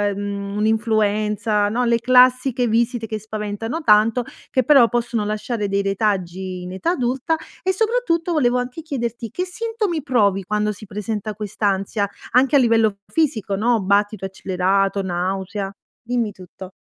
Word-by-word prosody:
mhmm, 200 0 -4
un'influenza, 210 -1 +1
no, 240 +4 0
le 235 -1 +2
classiche 255 0 +4
visite 230 +1 0
che 215 0 -4
spaventano 215 +6 -4
tanto, 220 +2 +4 0.3
che 260 - +1
però 265 -2 +6
possono 235 -2 -1
lasciare 210 0 -2
dei 200 0 0
retaggi 190 -2 -2
in 180 0 -7
età 190 - -1
adulta. 265 +1 0 0.3
E 375 - +1
soprattutto 430 -5 0
volevo 250 -6 +2
anche 250 +6 -5
chiederti 240 -6 -4
che 360 - -3
sintomi 420 -3 -2
provi 205 -8 +2
quando 210 +1 0
si 210 +1 -10
presenta 210 +1 -4
quest'ansia 205 -1 -2 0.4
anche 265 +4 +4
a - - +7
livello 225 -4 +3
f - - -26
fisico, 225 -11 +1
no, 225 +1 +2
battito 200 +1 +1
accelerato, 190 +1 0
nausea. 190 +2 -3 0.3
Dimmi 235 -2 -1
tutto. 185 0 -11
215 Hz, 145 wpm, -21 LUFS, 200-250 Hz, 0.4 s, a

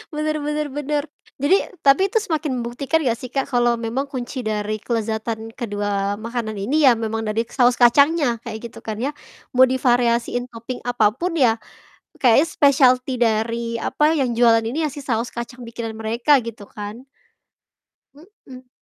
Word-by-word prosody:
bener 305 0 -1
bener 300 0 -1
bener. 290 +1 -2 0.4
Jadi 295 +7 +4 0.3
tapi 275 +6 +6
itu 450 - 0
semakin 310 -5 -2
membuktikan 250 +6 -1
gak 235 -1 +1
sih 255 - -7
Kak, 270 +1 -1
kalau 240 -1 +3
memang 235 +5 -3
kunci 255 0 -5
dari 215 0 -2
kelezatan 225 -1 -3
kedua 205 -2 -2
makanan 230 -1 -4
ini 275 +9 +1
ya 240 - +6
memang 225 0 -2
dari 220 +2 0
saus 245 -2 +3
kacangnya, 280 0 +4
kayak 225 -2 -6
gitu - - -12
kan 215 -1 -5
ya. 280 +3 -1 0.4
Mau 260 +1 +8
divariasiin 245 -1 +1
topping 235 +2 -7
apa 220 -4 +2
pun 340 +5 -3
ya, 230 -5 +4 0.6
kayaknya 260 +5 +5
specialty 260 -3 +3
dari 230 +1 0
apa, 300 +6 +1
yang 250 -3 +1
jualan 230 -1 +4
ini 295 +8 -2
ya - - -8
si - - -9
saus 235 -2 -1
kacang 240 +1 -7
bikinan 230 -1 -6
mereka 235 +6 +2
gitu 220 -3 -8
kan. 210 +5 -8 1.1
Mhm. 280 -6 -15
240 Hz, 160 wpm, -21 LUFS, 225-275 Hz, 1.1 s, Mau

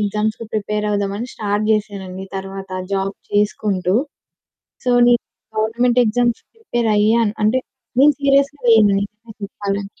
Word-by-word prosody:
ఎగ్జామ్స్‌కి 215 +2 -1
ప్రిపేరవుదామని 210 +1 -2
స్టార్ట్ 205 0 -1
చేశానండి. 195 -3 -3
తరువాత 195 0 -7 0.2
జాబ్ 195 0 -1 0.2
చేసుకుంటూ. 205 -3 0 0.9
సో, 250 - +1 0.2
నేను 240 -1 +4 0.4
గవర్నమెంట్ 235 +3 +2
ఎగ్జామ్స్‌కి 235 +1 0
ప్రిపేరయ్యాను. 225 - +1
అంటే 235 +5 +3 0.4
నేను 295 +1 +7
సీరియస్‌గా 280 +1 +2
లేను 220 -2 +6
నిజం 210 +2 -8
చెప్పాలంటే. 200 0 -5
210 Hz, 110 wpm, -19 LUFS, 200-235 Hz, 0.9 s, నేను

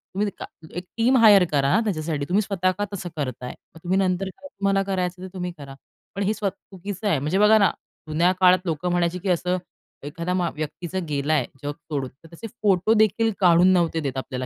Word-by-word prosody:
तुम्ही 210 +1 +1 0.5
एक 180 - -3
team 250 +3 +4
hire 210 -5 +7
करा 140 -2 +2
ना, 220 - +4
त्याच्यासाठी. 155 -7 -2
तुम्ही 200 +4 +3
स्वतः 190 -3 0
का 205 - -1
तसं 180 -2 -5
करताय? 130 -4 -5 0.2
मग 165 - -12
तुम्ही 185 +2 0
नंतर 190 0 0
काय 280 - -13
तुम्हाला 195 -4 0
करायचं 185 -2 -2
ते - - -5
तुम्ही 180 -1 -4
करा. 140 -2 -10 0.4
पण 200 - -1
हे 210 - +1
स्व 210 -2 -1
चुकीचं 195 +2 -7
आहे. 160 -8 +2
म्हणजे 150 +7 -1
बघा 210 +1 +6
ना, 200 -3 +4 0.4
जुन्या 170 +4 +2
काळात 185 -1 +6
लोकं 165 +2 -2
म्हणायची 175 0 0
की 190 +1 -4
असं 180 +1 +1 0.5
एखाद्या 170 +4 -3
मा 180 -2 0
व्यक्तीचं 170 +4 -4
गेलाय 145 -2 0 0.2
जग 145 - -2
सोडून, 145 -5 -5
तर - - -13
तसे 225 +7 -8
फोटो 200 +1 +3
देखील 220 +1 +3
काढून 175 -1 +5
नव्हते 170 -2 +1
देत 135 -4 -3
आपल्याला. 130 -1 -4
180 Hz, 205 wpm, -23 LUFS, 155-195 Hz, 0.5 s, hire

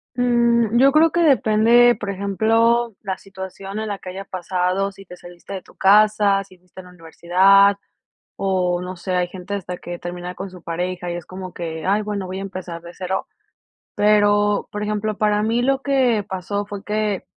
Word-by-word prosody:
Mm, 235 -2 +2
yo 275 +1 +6
creo 320 +2 +4
que 345 - 0
depende, 240 -3 +5
por 205 - -5
ejemplo, 225 +4 +1
la 190 -2 -4
situación 195 +1 -8
en 220 - -3
la 205 -1 -4
que 185 - -9
haya 195 +2 -7
pasado, 185 +1 -1
si 195 0 -15
te 180 - -11
saliste 175 +2 -12
de 190 - -5
tu - - -21
casa, 205 0 +4
si 185 -1 -19
fuiste 180 +1 -17
a - - -18
la - - -14
universidad 185 +4 +3 0.6
o 180 -2 0
no 185 +1 -6
sé, 185 +2 -4
hay 180 -1 +1
gente 185 +2 -7
hasta 180 -2 -5
que 175 0 -8
termina 175 +1 -6
con 195 +1 -7
su 180 -1 -13
pareja 180 +1 -4
y - - -3
es 175 -1 -6
como 185 -1 -8
que: 160 -2 -5
"Ay, 205 +3 +2
bueno, 205 -2 -4
voy 185 +1 -5
a - - -5
empezar 185 -3 -7
de 170 - -10
cero". 190 0 -3 0.7
Pero, 205 0 +3
por 210 - -4
ejemplo, 210 0 -2
para 210 -1 +2
mí 230 +2 +1
lo 270 +2 +1
que 255 -7 +2
pasó 190 +2 -3
fue 205 -1 -8
que 210 -2 -2
195 Hz, 195 wpm, -21 LUFS, 180-215 Hz, 0.7 s, yo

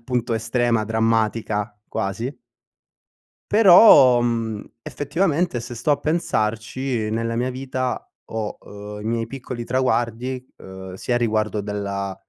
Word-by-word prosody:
appunto 120 -1 -2
estrema, 115 0 +1
drammatica 110 -1 0 0.2
quasi. 115 +8 -3 1.2
Però, 180 - +8
mhmm, 115 -3 -1 0.2
effettivamente 155 0 -1
se 120 +1 -7
sto 120 +6 -1
a - - +2
pensarci 120 -6 -1
nella 115 +1 -1
mia 120 +2 0
vita 130 0 -3 0.2
ho, 110 -2 -4
uhm, 105 0 -9
i - - -9
miei 115 0 -1
piccoli 125 -1 -6
traguardi, 125 0 -1
uhm, 95 0 -10
sia 120 +6 -1
riguardo 110 -3 0
della 100 -1 -3
115 Hz, 115 wpm, -22 LUFS, 110-130 Hz, 1.2 s, Però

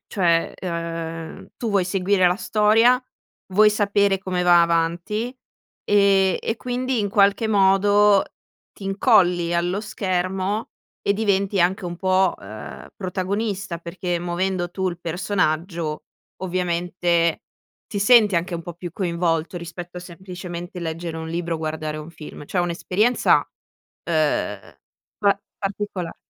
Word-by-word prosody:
cioè, 170 -4 +1
ehm, 165 -2 -5
tu 230 -3 -3
vuoi 195 -3 +2
seguire 185 0 +2
la 180 - +3
storia, 225 +4 +4 0.5
vuoi 210 +2 +6
sapere 200 -1 +2
come 185 -2 -2
va 175 -1 +6
avanti 170 +8 0 0.5
e 200 -2 +4
e 225 - -1
quindi 250 0 -2
in 205 - 0
qualche 200 +2 +3
modo 205 0 +4 0.5
ti - - -15
incolli 180 -4 +3
allo 175 +3 0
schermo 190 0 -2 0.3
e 200 - +2
diventi 200 -2 +1
anche 185 +3 +1
un 175 0 -4
po', 185 +1 +2
ehm, 105 +2 -9
protagonista, 195 0 -3
perché 175 +1 -3
muovendo 175 +1 -1
tu 190 0 -1
il 170 -1 -6
personaggio, 170 -2 -1 0.4
ovviamente 175 -2 0 0.4
ti 200 - -4
senti 210 -2 +6
anche 175 +2 -1
un 165 - -7
po' 175 - -7
più 175 +1 -7
coinvolto 170 -2 -1
rispetto 175 +1 -7
a - - -8
semplicemente 180 0 -8
leggere 165 0 -4
un 160 0 -5
libro, 170 0 -2
guardare 155 -1 -3
un 155 +2 -8
film, 155 -3 -10
cioè 180 - 0
è - - +1
un'esperienza, 185 +7 +2 0.6
ehm, 155 -3 -1 0.4
pa 200 -1 +2 0.2
particola 195 -3 -4
185 Hz, 130 wpm, -22 LUFS, 170-200 Hz, 0.6 s, vuoi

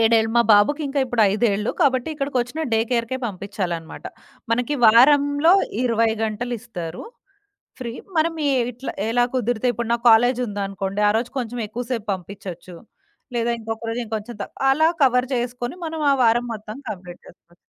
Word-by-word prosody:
7ఏళ్లు 225 0 +3
మా 235 - +6
బాబుకి 285 +10 +3
ఇంక 275 +1 -6
ఇప్పుడు 245 -3 +1
5ఏళ్లు 210 -1 +1
కాబట్టి, 260 -1 +2
ఇక్కడికొచ్చిన 275 0 -2
డేకేర్‌కే 230 +2 0
పంపించాలనమాట. 185 -5 -5 0.5
మనకి 245 +5 0
వారంలో 285 +7 +6 0.3
20 230 -1 +2
గంటలిస్తారు, 220 -6 -5 0.8
ఫ్రీ. 235 -2 -4 0.3
మనం 330 +1 +2
ఈ - - +3 0.2
ఇట్లా 250 +4 -6 0.2
ఎలా 245 +1 +3
కుదిరితే 245 -1 0
ఇప్పుడు 235 -1 -4
నా 235 - +2
కాలేజుందనుకోండి, 205 -5 +1
ఆ - - +4
రోజు 240 +1 -4
కొంచెం 245 -1 -4
ఎక్కువ 245 +3 -5
సేపు 225 -3 -3
పంపించొచ్చు, 180 -1 -9 0.6
లేదా 235 0 0
ఇంకొక 225 0 -5
రోజు 235 - -3
ఇంకొంచెం 220 +1 -5
తక్ - - -9 0.2
అలా 315 +4 +4
కవర్ 250 -1 +3
జేసుకొని, 245 +2 -3
మనం 315 -1 -4
ఆ - - +4
వారం 240 +2 +3
మొత్తం 215 +1 -8
కంప్లీట్ 180 -3 -8
చేసుకోవచ్చు. 175 0 -19
235 Hz, 145 wpm, -22 LUFS, 210-250 Hz, 0.8 s, మా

